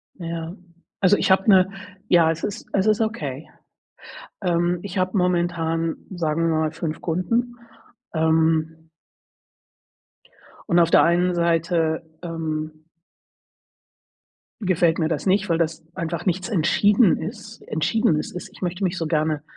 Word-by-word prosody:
Ja, 170 0 -6 0.4
also, 195 +1 +5
ich - - 0
habe 190 +3 +3
'ne 190 -1 +5 0.4
ja, 165 -2 +5
es 165 0 -3
ist 205 - -5
es 195 +1 +1
ist 215 0 +3
okay. 155 - -3 0.9
Ähm, 175 -1 +1
ich 195 -1 -6
habe 185 +2 0
momentan, 170 -2 0 0.2
sagen 165 -2 -1
wir 160 - +1
mal, 155 0 0
5 155 0 -5
Kunden, 230 +9 -1 0.6
ähm. 160 0 +2 1.9
Und 170 - +4
auf 170 -1 +4
der - - +7
einen 175 +1 +2
Seite, 165 -1 +1 0.2
ähm 155 -2 -5 1.8
gefällt 175 -3 +2
mir 160 - +1
das 155 -3 -2
nicht, 195 +1 +2
weil 165 - +2
das 165 -1 -1
einfach 170 0 -4
nichts 185 +4 -1
entschieden 205 +3 +3
ist 215 0 -8
entschiedenes 160 0 0
ist, 180 - -8
ich - - -16
möchte 180 +1 -2
mich 180 +1 -1
so 165 - -2
gerne 155 -1 0
170 Hz, 135 wpm, -23 LUFS, 160-185 Hz, 1.9 s, der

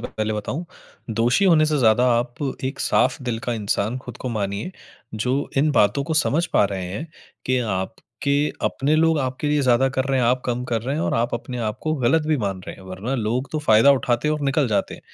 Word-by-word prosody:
पहले 110 0 -3
बताऊँ, 130 - -4 0.5
दोषी 120 - +2
होने 165 -4 +5
से 150 -1 +1
ज़्यादा 120 +1 +4
आप 120 0 -3 0.3
एक 135 - -3
साफ़ - - +1
दिल 115 -2 -2
का 120 - 0
इंसान 110 +3 -1
खुद - - -10
को 130 - -4
मानिए, 105 - -3 0.4
जो 125 +6 -1
इन 150 +2 +3
बातों 140 +4 +3
को 160 - -2
समझ 165 +4 +1
पा - - +5
रहे 95 -2 -3
हैं, 105 - -5 0.4
कि 130 0 +2
आपके 95 -5 -3 0.6
अपने 150 +3 +1
लोग 160 -1 +3
आपके 130 +3 -2
लिए 150 0 +2
ज़्यादा 130 +1 +3
कर 130 0 -1
रहे 135 -1 0
हैं, 120 - +2
आप 125 +1 +2
कम 125 0 -1
कर 115 -3 -2
रहे 135 +4 -2
हैं 160 - -1
और - - 0
आप 120 +1 0
अपने 125 +1 -5
आपको 155 +8 -3
गलत 150 +5 +2
भी 155 - +2
मान 95 -2 -3
रहे - - -6
हैं - - -14
वरना 95 +8 -4
लोग 120 +2 -2
तो 155 - 0
फायदा 115 0 +5
उठाते 125 +1 0
हैं 155 - +2
और 150 - -4
निकल 140 -2 +1
जाते। 105 - -1
125 Hz, 220 wpm, -22 LUFS, 110-145 Hz, 0.6 s, होने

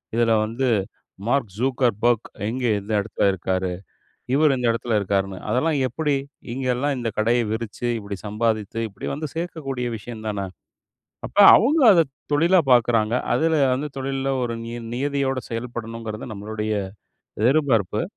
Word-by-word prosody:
இதுல 115 -1 +3
வந்து 125 +4 -2 0.6
Mark 135 0 +2
Zuckerberg 120 -3 +2 0.3
எங்கே 120 +1 -1
எந்த 100 +3 -8
இடத்துல 105 +2 -2
இருக்காரு. 95 0 -2 0.6
இவர் 150 -1 +4
இந்த 125 -1 -1
இடத்துல 115 -1 -1
இருக்காருன்னு. 95 -1 -1
அதெல்லாம் 145 +5 +1
எப்படி? 145 +3 -1 0.4
இங்க 130 +1 -3
எல்லாம் 140 +3 0
இந்த 120 -2 -2
கடைய 115 +3 +3
விரிச்சு, 115 +1 -4
இப்டி 100 -1 -6
சம்பாதித்து, 110 0 -1
இப்டி 100 - -7
வந்து 150 +1 -4
சேர்க்கக்கூடிய 145 -7 -4
விஷயம் 110 +1 -9
தான! 100 -2 -2 0.8
அப்ப - - -16 0.2
அவங்க 285 +8 +3
அத 170 -3 +6 0.3
தொழிலா 170 +5 +4
பார்க்கறாங்க. 115 -1 +3 0.2
அதுல 160 0 +2 0.2
வந்து 145 +3 -3
தொழில்ல 135 0 -2
ஒரு 115 -1 -2
நிய 120 +1 -6 0.2
நியதியோடு 135 0 -1
செயல்படணும்ங்கிறது 115 -1 -5
நம்மளுடைய 105 +1 -3 0.7
எதிர்பார்ப்பு. 125 -6 +2
120 Hz, 130 wpm, -23 LUFS, 110-135 Hz, 0.8 s, அத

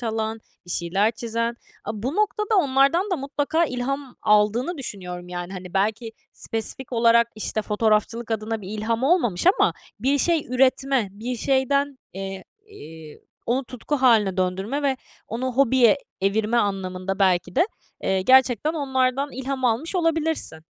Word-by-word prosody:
çalan, 220 -1 -2 0.3
bir 175 - -9
şeyler 195 +6 +1
çizen. 230 +1 -3 0.3
A, - - -4
bu 265 +6 -2
noktada 425 0 +1
onlardan 285 +5 +3
da 365 - +1
mutlaka 290 +4 0
ilham 265 0 -4
aldığını 215 - +2
düşünüyorum, 180 -7 -7
yani, 175 +1 -5
hani, 180 -1 -8
belki 220 +3 0 0.2
spesifik 240 +3 -5
olarak, 235 0 +4
işte, 215 0 -2
fotoğrafçılık 220 +2 0
adına 220 0 -2
bir 190 - -9
ilham 220 +3 -2
olmamış 270 - +2
ama - - +4 0.3
bir 275 +5 +2
şey 330 +1 +1
üretme, 260 -2 +2
bir 235 +4 -5
şeyden, 275 +2 +1
eee, 195 0 -6 0.2
iii, 160 - -12 0.3
onu 255 +3 0
tutku 255 +4 -3
hâline 220 -7 +3
döndürme 190 +9 -1
ve 270 -2 +1 0.3
onu 250 +3 -3
hobiye 260 -1 +4 0.2
evirme 210 +4 +1
anlamında 195 -2 -1
belki 185 +4 +1
de, 345 - +4 0.4
eee, 190 -1 +1
gerçekten 260 +4 +4
onlardan 270 -1 0
ilham 265 +1 -4
almış 250 - 0
olabilirsin. 320 - -1
235 Hz, 140 wpm, -23 LUFS, 210-275 Hz, 0.4 s, olarak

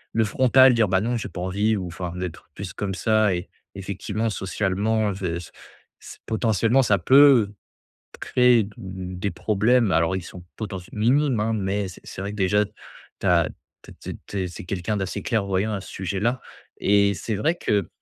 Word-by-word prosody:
le 110 -1 +3
frontal, 130 +4 +5
dire: 110 -3 +3
«Bah 95 +1 +2
non, 120 +2 -1
j'ai - - -4
pas 90 - -7
envie» 100 +4 +1
ou 95 -3 -3
enfin, 85 0 -6
d'être 90 -2 -6
plus 95 -3 -7
comme 100 -2 -3
ça. 110 0 +2
Et, 90 0 -4 0.2
effectivement, 100 +3 -3
socialement 105 +2 0
v 90 -3 -3
c 85 - -10 0.5
c - - -11
potentiellement 115 +3 +2
ça 100 -4 +3
peut 130 - +6 0.7
créer 125 -2 +4
d 100 - -10
des 95 -1 -5
problèmes, 110 +4 +2
alors, 85 +3 +2
ils 95 - -4
sont 90 +1 -10
potentiel 95 -3 -7
minimes 130 +2 +2
hein, 110 +1 0
mais 100 -1 -1
c’est 90 - -12
c'est - - -8
vrai 100 - -3
que - - -8
déjà 105 +2 +2 0.6
tu - - -3
as 85 -3 +4 0.3
tu - - -14
es - - -13
tu - - -7
es - - -6
tu 100 - -5
es - - -3
c’est 85 - -9
quelqu'un 95 +3 -2
d'assez 95 -1 -3
clairvoyant 100 -2 0
à 95 - -3
ce - - -12
sujet-là 100 +7 -2 0.4
et 100 0 +4
c'est 105 +6 -4
vrai 155 - +1
que 100 - 0
100 Hz, 195 wpm, -24 LUFS, 95-110 Hz, 0.7 s, peut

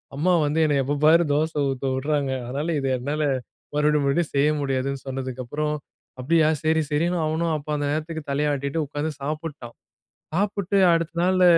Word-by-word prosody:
அம்மா 180 +6 +2
வந்து 150 +2 0
என்னை 150 - +2
எப்ப 145 +2 -1
பாரு 165 +2 +6
தோசை 155 0 0
ஊத்த 135 0 -3
விடுறாங்க. 140 0 0 0.2
அதனால 140 +6 -3
இது 135 - -2
என்னால 145 +5 -2 0.5
மறுபடி 150 0 +3
மறுபடி 140 +5 +2
செய்ய 140 +2 +4
முடியாதுன்னு 135 -1 -1
சொன்னதுக்கப்புறம், 135 +3 -3 0.5
அப்படியா 155 +4 +3 0.2
சரி 160 0 +3
சரின்னு 170 +4 +1
அவனும் 160 +1 0
அப்ப 145 - -11
அந்த 145 - -1
நேரத்துக்கு 160 +1 -3
தலையாட்டிட்டு 140 +1 0
உக்காந்து 145 +2 -3
சாப்பிட்டான். 150 -4 -5 0.6
சாப்பிட்டு 200 +1 0 0.2
அடுத்த 165 0 0
நாள்ல 185 +1 +3
150 Hz, 150 wpm, -24 LUFS, 140-160 Hz, 0.6 s, பாரு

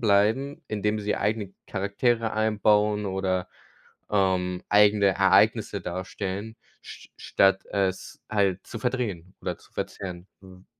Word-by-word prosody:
bleiben, 110 +7 +2
indem 105 0 -1
sie 105 0 -1
eigene 105 -2 -2
Charaktere 110 +4 0
einbauen 105 -1 +2
oder, 95 -1 -1 0.6
ähm, 95 -3 +1
eigene 105 0 +5
Ereignisse 95 - +3
darstellen, 95 +4 -5 0.3
sch - - -12
statt 95 0 +2
es 95 -2 -2
halt 100 -3 +1
zu 115 - -7
verdrehen 105 -8 -3
oder - - -3
zu - - -22
verzerren, 90 -2 -6
hm. 95 -1 -15
100 Hz, 115 wpm, -26 LUFS, 95-110 Hz, 0.6 s, eigene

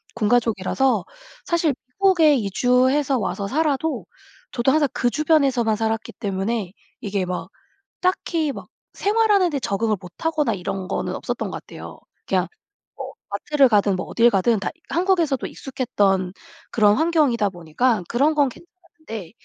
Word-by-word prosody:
군 220 -2 0
가족이라서 240 +2 +1 0.4
사실 335 -3 +1 0.2
미국에 350 -6 +4
이주해서 255 +5 +2
와서 200 -2 -3
살아도 305 +4 -1 0.5
저도 240 +2 +1
항상 300 0 +3
그 245 0 +1
주변에서만 275 -6 +2
살았기 225 0 -2
때문에 195 0 -3 0.3
이게 200 -2 -2
막 180 0 -4 0.5
딱히 335 -4 0
막 - - -9 0.3
생활하는 410 -3 +2
데 290 -4 -2
적응을 215 -1 -1
못하거나 280 - -2
이런 190 0 -4
거는 - - -2
없었던 - - -4
것 - - -7
같아요. - - -10 0.3
그냥 - - +1 0.5
뭐 - - -7 0.2
마트를 270 +7 +2
가든 205 -3 +3
뭐 185 - -4
어딜 235 +1 +4
가든 220 +1 +2
다 195 - -2 0.2
한국에서도 340 -6 +1
익숙했던 195 -8 -1 0.4
그런 210 -2 +4
환경이다 295 -10 +2
보니까 180 +5 0
그런 285 +6 +2
건 285 -3 +3
괜찮았는데 315 - -11
245 Hz, 325 characters per minute, -22 LUFS, 205-305 Hz, 0.5 s, 미국에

